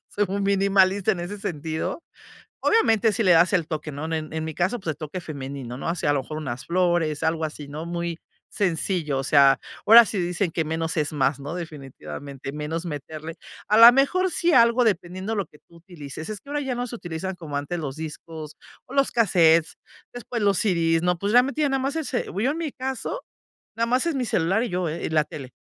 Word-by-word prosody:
soy 205 0 0
muy 200 +2 -2
minimalista 195 0 +3
en 180 - -4
ese 190 +4 -6
sentido. 160 - -4 0.6
Obviamente, 225 - +3
sí 220 +2 0
le 185 - +5
das 170 +3 +5
el 170 -5 +1
toque, 155 -2 -4
¿no? 145 +2 -5
En 155 -1 -3
en 160 0 -2
mi 160 - -5
caso, 185 +10 0
pues, 165 -4 -3
el - - -22
toque 155 +3 -6
femenino, 135 -5 -7
¿no?, 135 - -5
o 165 - 0
sea, 145 - 0
a - - +2
lo 140 - 0
mejor 155 +4 -7
unas 130 -5 -5
flores, 170 -4 +1
algo 160 0 0
así, 150 -2 -7
¿no?, 150 +3 -6
muy 170 0 -4 0.3
sencillo, 170 -5 0
o 135 - -2
sea, 140 -1 +5 0.2
ahora 230 +2 +10
sí 210 -2 -3
dicen 175 0 -1
que 160 -1 -1
menos 160 +1 -2
es 150 -1 0
más, 140 -1 +1
¿no?, 145 +4 -6
definitivamente, 140 -4 -8
menos 150 +3 -4
meterle 155 +1 -6 0.3
a 210 - +4
la 230 +1 +11
mejor, 365 +8 +2
sí, 345 0 +1
algo, 235 -2 +5
dependiendo 185 0 -1
lo 200 -3 -1
que 150 - -20
tú 170 - -20
utilices. 160 -4 -9
Es 215 -1 -5
que 280 - -16
ahora 295 0 -1
ya 265 -3 -2
no 245 +1 -2
se 240 - -6
utilizan 175 0 -5
como 160 -5 -7
antes 145 +5 -3
los 140 -4 -5
discos 155 0 -8 0.3
o 255 - -12
los 275 -1 +2
cassettes, 165 -7 +3 0.4
después 245 -1 -5
los 200 -2 +3
CD's, 165 -5 +2
¿no? 180 0 +1
Pues, 200 +4 -2
realmente 265 +6 +3
nada 270 -2 +1
más 275 +3 -2
ese 295 -6 -2
bu 195 - -4
yo 260 +5 +2
en 305 - -4
mi 325 -3 -3
caso 265 - -4 0.5
nada 230 0 0
más 255 +5 +2
es 335 - 0
mi 260 -2 -1
celular 195 0 +1
y 245 - -2
yo, 180 -1 -1
eh, 160 +2 -5
y - - -2
la 155 -1 +3
tele. 135 -4 -9
175 Hz, 225 wpm, -24 LUFS, 155-215 Hz, 0.6 s, la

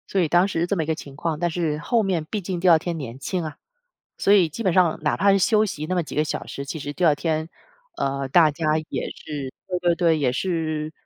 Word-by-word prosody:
所 195 - 0
以 170 - +2
当 175 +4 +4
时 170 -3 -1
这 200 - 0
么 165 - 0
一 - - -5
个 160 - 0
情 140 -3 -10
况， 155 +1 -2
但 175 0 +1
是 160 -3 -1
后 225 +9 +1
面 180 -5 -1
毕 210 - -2
竟 180 -1 -3
第 180 +1 +3
2 165 - +8
天 170 +1 -4
年 130 -4 -7
轻 180 +5 -2
啊， 155 -2 -6 0.6
所 200 - +3
以 185 -5 +5
基 200 +10 -6
本 185 -4 +2
上 175 -3 +3
哪 150 - 0
怕 200 +1 +4
是 195 - +3
休 215 +3 +3
息 155 -7 -4
那 185 - -1
么 175 - +1
几 - - -8
个 150 - +3
小 155 - -4
时， 140 - -6
其 155 +3 -5
实 145 0 -5
第 180 - 0
2 155 -3 +5
天， 160 +1 -2 0.5
呃， 135 0 -1
大 160 +1 +5
家 155 +2 -4 0.2
也 - - -3
是 140 -4 -6 0.2
对 180 -1 -2
对 175 -1 +2
对， 165 -2 +3
也 135 -4 +1
是 155 0 -2
165 Hz, 275 characters per minute, -23 LUFS, 150-180 Hz, 0.6 s, 2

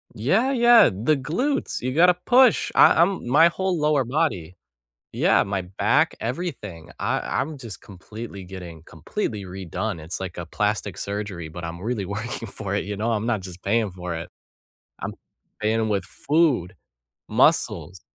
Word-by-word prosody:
Yeah, 195 - +2
yeah, 240 - +6
the 115 +10 +1
glutes. 250 - -1
You 130 +1 -2
gotta 180 +3 +6
push. 250 -2 +5
I 165 - +7
I'm 185 -7 +1
my 150 +7 +6
whole 185 +1 -1
lower 150 -3 +2
body. 115 - -1 0.6
Yeah, - - +3
my 100 -1 -2
back, 105 - +1
everything. 110 - -5
I - - 0
I'm 150 +1 -2
just 115 -6 -8
completely 100 +1 -9
getting 90 -3 -10
completely 100 - -4
redone. 95 +1 -4
It's 80 +3 -5
like 95 -2 -6
a 85 - -5
plastic 105 +1 -2
surgery, 100 -5 -4
but 85 +2 -9
I'm 85 +1 -6
really 110 -2 -2
working 110 +4 -4
for 100 -2 -4
it, 100 - -1
you 105 0 -4
know, 110 +3 -1
I'm 110 -1 -1
not 115 -4 0
just 90 -1 -10
paying 110 +1 +1
for 90 -1 -6
it. 80 - -6 0.7
I'm - - -4 0.5
paying 110 +1 +1
with 100 -4 0
food, 140 - +1 0.5
muscles, 90 -1 +2
105 Hz, 160 wpm, -24 LUFS, 95-150 Hz, 0.7 s, I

